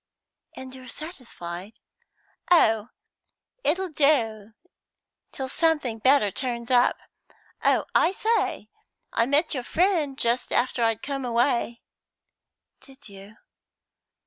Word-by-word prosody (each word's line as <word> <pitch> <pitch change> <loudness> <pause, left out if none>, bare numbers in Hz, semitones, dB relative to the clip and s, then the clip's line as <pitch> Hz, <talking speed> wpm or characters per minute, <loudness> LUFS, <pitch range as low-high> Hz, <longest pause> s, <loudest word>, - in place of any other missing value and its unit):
"And 260 0 -9
you're 260 -1 -11
satisfied?" 220 - -8 0.8
"Oh, 225 -10 +4 0.7
it'll 365 +5 0
do 230 -9 +1 0.8
till 265 - -5
something 295 -6 0
better 255 -3 +4
turns 240 +2 -4
up. 245 0 +4 0.7
Oh, - - +3
I - - +4
say, 415 - -1 0.4
I 230 +1 +2
met 295 +4 +2
your 260 - -2
friend 315 -1 +1
just 235 0 0
after 245 -1 +1
I'd 225 -1 0
come 275 -1 -3
away." 240 -1 0 1.0
"Did 270 -3 -16
you?" 200 +2 -13
255 Hz, 105 wpm, -25 LUFS, 225-290 Hz, 1.0 s, Oh